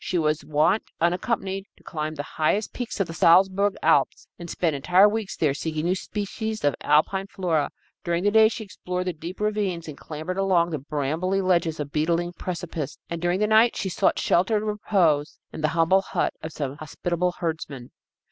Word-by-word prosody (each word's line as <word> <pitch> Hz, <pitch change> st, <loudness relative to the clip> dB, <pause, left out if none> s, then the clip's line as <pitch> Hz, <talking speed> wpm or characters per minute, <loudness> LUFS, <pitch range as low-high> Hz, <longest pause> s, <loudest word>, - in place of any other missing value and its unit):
She 180 Hz, -, -1 dB
was 155 Hz, -2 st, +1 dB
wont, 155 Hz, +8 st, +2 dB, 0.2 s
unaccompanied, 195 Hz, +2 st, -1 dB
to -, -, -23 dB
climb 155 Hz, -1 st, -4 dB
the 145 Hz, -, -4 dB
highest 160 Hz, +9 st, -1 dB
peaks 245 Hz, -3 st, -5 dB
of 195 Hz, -, +2 dB
the 165 Hz, -, -8 dB
Salzburg 190 Hz, +4 st, +4 dB
Alps, -, -, +2 dB
and 170 Hz, -1 st, -8 dB
spend 160 Hz, -3 st, 0 dB
entire 180 Hz, +8 st, +5 dB
weeks 210 Hz, -1 st, -3 dB
there 150 Hz, -4 st, +2 dB
seeking 155 Hz, +2 st, -3 dB
new 180 Hz, -, +2 dB
species 215 Hz, +3 st, -4 dB
of 145 Hz, -1 st, +3 dB
Alpine 190 Hz, +6 st, +2 dB
flora. 165 Hz, -7 st, 0 dB, 0.3 s
During 170 Hz, 0 st, -1 dB
the 205 Hz, -, +3 dB
day 220 Hz, 0 st, +7 dB
she 225 Hz, -, -5 dB
explored 180 Hz, -2 st, -5 dB
the 180 Hz, -, -1 dB
deep 170 Hz, +3 st, -8 dB
ravines 205 Hz, -5 st, -1 dB
and 155 Hz, -, -7 dB
clambered 160 Hz, +6 st, -5 dB
along 180 Hz, -3 st, +2 dB
the 155 Hz, -, -2 dB
brambly 155 Hz, +7 st, -1 dB
ledges 175 Hz, -4 st, +1 dB
of 145 Hz, -1 st, -4 dB
beetling 170 Hz, +3 st, 0 dB
precipices, 165 Hz, -5 st, -5 dB
and 170 Hz, -1 st, -3 dB
during 175 Hz, +1 st, +1 dB
the 210 Hz, -, +3 dB
night 220 Hz, +2 st, +4 dB
she 190 Hz, -, -2 dB
sought -, -, +1 dB
shelter 185 Hz, +5 st, +2 dB
and 210 Hz, -, -2 dB
repose 185 Hz, -8 st, +1 dB, 0.2 s
in -, -, -6 dB
the 155 Hz, -, +3 dB
humble 165 Hz, +4 st, +4 dB
hut -, -, -1 dB
of 160 Hz, -, -6 dB
some 140 Hz, -2 st, -4 dB
hospitable 175 Hz, +3 st, -2 dB
herdsman. 155 Hz, -7 st, -5 dB
175 Hz, 190 wpm, -25 LUFS, 155-195 Hz, 0.3 s, day